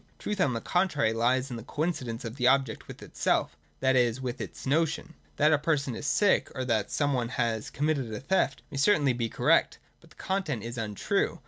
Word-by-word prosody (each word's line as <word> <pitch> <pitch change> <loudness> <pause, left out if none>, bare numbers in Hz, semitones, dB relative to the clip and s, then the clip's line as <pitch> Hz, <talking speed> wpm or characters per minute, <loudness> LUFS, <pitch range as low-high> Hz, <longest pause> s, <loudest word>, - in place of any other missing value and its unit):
Truth, 205 -2 -3
on 135 -6 +2
the 115 - -3
contrary, 150 -11 +1
lies 125 +3 +1
in 120 - -4
the 115 - -8
coincidence 135 -5 -3
of 115 +1 -5
the 125 -2 +1
object 135 -3 +2
with - - -10
itself, - - 0 0.3
that 130 0 +3
is, 120 -1 +2
with 130 0 -4
its - - -7
notion. 160 +3 0 0.2
That 155 +1 +4
a 150 - +3
person 145 -4 0
is 145 - -5
sick, 200 +6 +2
or 130 - -2
that 110 -4 0
some 145 -1 0
one 120 -3 -1
has 115 -4 -1
com 145 - -2
mitted 140 -7 0
a 105 - -4
theft, 135 -5 0
may - - -5
certainly 145 -3 +3
be 120 -1 -2
correct. - - +2 0.2
But - - -20
the - - -20
content 170 - -2
is 115 +1 -5
untrue. 105 -3 -1
130 Hz, 215 wpm, -28 LUFS, 115-150 Hz, 0.3 s, That